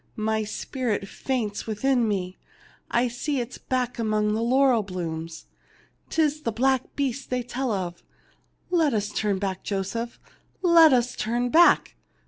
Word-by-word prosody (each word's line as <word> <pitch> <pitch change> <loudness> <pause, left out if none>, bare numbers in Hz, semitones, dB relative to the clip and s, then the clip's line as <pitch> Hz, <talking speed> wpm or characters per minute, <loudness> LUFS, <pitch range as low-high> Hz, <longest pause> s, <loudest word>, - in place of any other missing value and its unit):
My 220 0 0
spirit 215 -1 -3
faints 225 -3 -3
within 240 +2 +1
me. 185 -3 -3 0.5
I 240 +1 +2
see 265 +4 -2
its 245 +1 -5
back 255 -2 -2
among 215 -1 +1
the 220 - -1
laurel 255 0 +3
blooms. 165 -4 -5 0.6
'Tis 305 -1 +1
the 230 - -1
black 260 +3 0
beast 275 -1 -2
they 250 -1 -1
tell 250 +1 -3
of. 175 -4 -3 0.7
Let 320 -8 +3
us 210 -1 -1
turn 210 -2 -1
back, 190 -1 -3
Joseph, 210 +4 -3 0.4
let 335 -3 +7
us 245 -1 +2
turn 240 +3 -1
back 340 +6 +5
235 Hz, 140 wpm, -25 LUFS, 210-260 Hz, 0.7 s, let